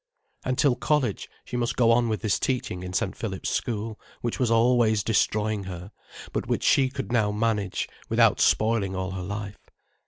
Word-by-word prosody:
And 130 0 -1
till 140 -4 +3
college, 150 -1 0 0.2
she - - -6
must 120 -1 -1
go 115 -2 +4
on 120 0 +3
with 110 - -2
this 105 -2 +1
teaching 125 -8 -2
in 90 0 -6
St. - - -1
Philip's - - -4
School, 110 -1 -3 0.2
which 120 - -3
was 125 -3 +2
always 115 -2 +3
destroying 105 -1 +1
her, 90 +1 -7 0.4
but - - -2
which - - -1
she 135 -2 +4
could 135 -2 -5
now 110 -4 +2
manage, 105 -3 -1 0.2
without - - +4
spoiling 110 -3 +2
all 95 0 -3
her 95 0 -4
life. 100 +2 -5
110 Hz, 180 wpm, -26 LUFS, 100-120 Hz, 0.4 s, go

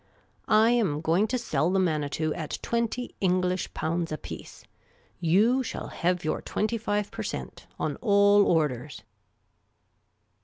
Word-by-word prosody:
I 220 +1 +5
am 200 -12 +1
going 170 +7 +2
to 255 +3 -1
sell 225 -8 0
the 190 - +1
Manitou 155 -3 0
at 155 -3 -4
twenty 235 +1 -2
English 185 -1 +1
pounds 165 +1 -2
apiece. 155 - -8 0.6
You 205 +10 +3
shall 255 - -5
hev 180 -1 -1
your 155 - -1
twenty 225 +2 -2
five 205 -1 -1
per - - -6
cent, - - -6
on - - -2
all 205 -2 +5
orders." 150 -4 0
185 Hz, 130 wpm, -27 LUFS, 160-215 Hz, 0.6 s, I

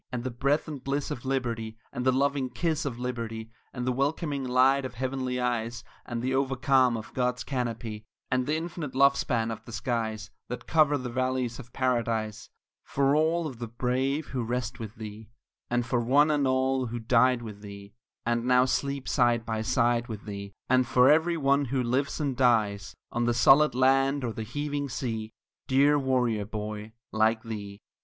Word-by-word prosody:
And 125 -1 -3
the 130 - -3
breath 140 +7 0
and 145 -4 -7
bliss 140 +1 -2
of 120 - -5
Liberty; 115 -4 -2 0.2
And 125 - -3
the 130 - +4
loving 135 0 +1
kiss 160 +4 -1
of 130 -4 -3
Liberty; 115 -3 -4 0.2
And 125 -2 -4
the 130 - +1
welcoming 140 +2 -1
light 130 +2 +3
of 130 -1 -6
heavenly 130 0 -2
eyes, 120 -1 -2 0.2
And 120 -1 -3
the 130 +1 0
over 135 0 +1
calm 130 -2 +3
of 110 - -9
God's 125 -1 0
canopy; 115 -4 -4 0.2
And 130 0 +1
the 150 - +1
infinite 160 -4 -5
love 140 +1 +5
span 115 -4 0
of 110 0 -7
the - - -10
skies 110 -2 -3 0.2
That 125 - -6
cover 150 -2 +3
the 125 -3 -5
valleys 130 -1 -1
of 120 -3 -11
Paradise 115 -5 -1 0.3
For 140 +1 +1
all 160 +2 +2
of 130 -7 -6
the 120 - -4
brave 130 +5 -1
who 130 - -2
rest 125 +2 -3
with 110 -1 -7
thee; 110 -1 -9 0.4
And 120 0 0
for 120 0 0
one 140 +6 +4
and 145 -2 +2
all 130 0 +1
who 120 +1 -4
died 120 +1 +3
with 105 -2 -8
thee, 100 0 -10 0.3
And 120 0 0
now 125 0 +5
sleep 140 +1 -1
side 120 -3 +2
by 110 -1 -2
side 120 +1 +1
with 110 -3 -7
thee; 100 -1 -6 0.2
And 130 -1 +3
for 125 +3 +5
every 165 +2 +3
one 140 -1 +2
who 130 0 -1
lives 130 +6 0
and 140 -4 -1
dies, 110 -6 +2 0.2
On 120 0 0
the 120 0 +1
solid 135 +4 +6
land 135 +2 +3
or 115 -2 -2
the 110 - -5
heaving 145 +5 -3
sea, 110 -3 -3 0.4
Dear 140 +2 +4
warrior 125 -6 +1
boy 105 0 -6 0.2
like 110 +1 +2
thee. 105 -3 -7
125 Hz, 190 wpm, -28 LUFS, 115-135 Hz, 0.4 s, solid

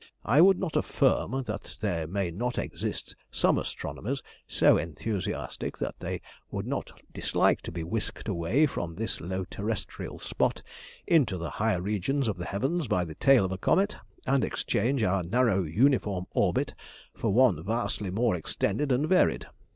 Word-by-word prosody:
I 135 +8 +5
would 190 +1 +7
not 175 -5 -3
affirm 135 +5 +1
that 105 -1 -6
there 85 -7 -1
may 95 0 -1
not 120 +8 -2
exist - - -4
some - - +2
astronomers 135 +5 -4 0.2
so - - +5
enthusiastic 90 +5 -4
that - - -4
they - - -4 0.3
would - - -4
not - - -3 0.2
dislike - - +2
to - - -7
be 85 0 -4
whisked 105 +8 -3
away 105 - +2
from 85 - -3
this 110 +5 -3
low 95 +1 -3
terrestrial 105 +3 -4
spot - - -1 0.4
into 135 - +3
the 85 0 -4
higher 105 -5 0
regions 110 +7 0
of 105 - -1
the 90 - -5
heavens 135 - -1
by 90 -5 +1
the 80 - -7
tail 135 - +5
of 95 - -3
a 95 - -4
comet, 195 - +2 0.3
and 135 0 +2
exchange 120 +3 0
our 95 -1 +2
narrow 105 +2 +2
uniform 100 - +2
orbit - - +1 0.4
for 115 - -1
one 105 - +4
vastly 110 -1 -1
more 110 +4 +1
extended 100 - -1
and 135 +5 +2
varied. 185 +1 +3
105 Hz, 160 wpm, -28 LUFS, 90-130 Hz, 0.4 s, would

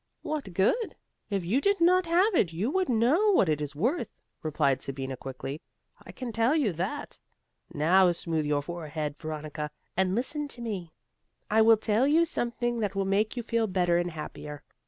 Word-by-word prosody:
"What 285 - -4
good? 430 - +1 0.3
if 195 -4 -1
you 230 +11 +1
did 400 +3 +2
not 360 +1 +4
have 365 +6 +3
it 190 - +2
you 195 +11 -1
would 375 -1 0
know 265 - +3
what 200 - +4
it 150 -1 0
is 145 -1 -4
worth," 245 - 0 0.3
replied 140 -4 +1
Sabina, 135 -1 -4
quickly. 135 +3 -6 0.4
"I - - -10
can 250 -2 -6
tell 230 +6 +2
you 260 - +1
that. 190 - -4 0.5
Now 175 +5 +4
smooth 165 -3 -2
your 145 -1 +1
forehead, 155 -2 -4
Veronica, 155 -1 -5 0.3
and 190 0 +1
listen 290 +5 -1
to 245 -4 -9
me. 195 -8 -4 0.6
I 220 +1 +5
will 225 0 +7
tell 220 +4 +2
you 325 +3 +4
something 240 -5 -2
that 205 -3 -2
will 195 0 0
make 210 +5 +1
you 240 - -2
feel 230 -1 0
better 175 -3 +2
and 175 0 -1
happier. 150 -2 -8
195 Hz, 180 wpm, -28 LUFS, 155-250 Hz, 0.6 s, will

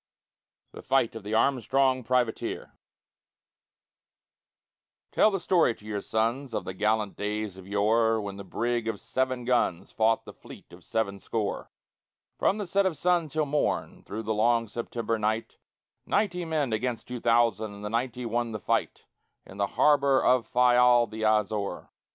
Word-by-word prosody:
THE - - -10
FIGHT 135 -4 +1
OF 115 - -7
THE 105 +2 -3
ARMSTRONG 130 +1 +2
PRIVATEER 125 -2 -1 2.4
Tell - - +4
the 195 -2 -2
story 170 -11 +2
to 105 - -19
your 105 -2 -3
sons 115 +6 -1
Of 95 - -3
the 95 - -5
gallant 105 +1 0
days 105 -1 -3
of 95 0 -12
yore, 110 +3 +2
When 100 -2 -5
the 100 - -7
brig 115 +4 -2
of 110 -3 -2
seven 130 -2 -2
guns 115 -7 0
Fought 110 0 +1
the - - -10
fleet - - -14
of - - -14
seven 100 -3 -2
score, 110 +1 -3 0.7
From 200 - +2
the 205 - -3
set 195 +2 +2
of 165 -5 -3
sun 175 -2 +2
till 155 +1 -1
morn, 145 +1 -1
through 110 +2 -6
the 110 0 -1
long 115 +2 +2
September 115 0 -3
night 110 +1 -2 0.5
Ninety 180 -4 0
men 150 -7 -1
against 120 +1 -2
two 125 -1 -5
thousand, 115 -2 +2
and 100 +1 -9
the - - -3
ninety 125 +1 -2
won 115 0 -1
the 110 - -4
fight - - -1 0.4
In 95 - -13
the 100 0 +1
harbor 140 -2 +4
of 125 -2 +2
Fayal 125 -1 +5
the 110 0 -8
Azore. 105 -3 0
115 Hz, 165 wpm, -27 LUFS, 110-130 Hz, 2.4 s, Fayal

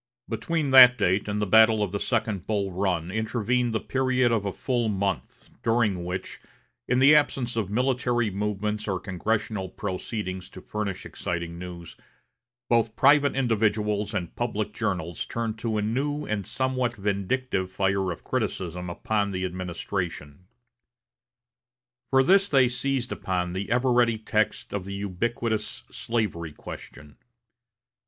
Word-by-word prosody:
Between 145 +5 -1
that 125 -2 +10
date 95 0 +1
and 105 0 -1
the 105 - +1
battle 110 +1 +6
of 100 - -2
the 100 - -2
second 110 -6 -1
Bull 100 -3 0
Run 90 -2 -1
intervened 115 +3 0
the 110 - 0
period 130 -1 +1
of 110 -3 +1
a 100 - -1
full 120 +1 -1
month, 100 -2 -3
during 110 -6 +1
which, 90 +1 -5 0.5
in 125 - +2
the 135 +3 +7
absence 135 -5 +2
of 110 -4 -1
military 120 -1 +1
movements 105 +2 -2
or 95 -2 -1
congressional 95 +1 -2
proceedings 95 -1 -4
to 95 - -11
furnish 100 -3 -4
exciting 85 0 -4
news, 90 -2 -9 0.7
both 115 -1 +2
private 140 +1 +5
individuals 105 -4 +1
and 90 -4 -3
public 110 -3 -2
journals 90 -7 -2
turned 115 -2 -3
a 110 -2 0
new 145 +7 -1
and 105 -3 -3
somewhat 130 -2 -1
vindictive 100 0 -1
fire 95 0 0
of 85 - -8
criticism 90 0 -3
upon 100 +3 -1
the 95 -1 -2
administration. 90 -3 -5 1.6
For 135 0 +5
this 195 +6 +4
they 130 -3 +5
seized 125 0 -2
upon 90 -1 -2
the 95 +2 -4
ever 125 +2 +2
ready 120 -2 +3
text 110 0 -1
of 100 -2 -3
the 100 0 -5
ubiquitous 105 +3 -2
slavery 95 -9 -2
question. 75 0 -10
105 Hz, 140 wpm, -26 LUFS, 95-120 Hz, 1.6 s, that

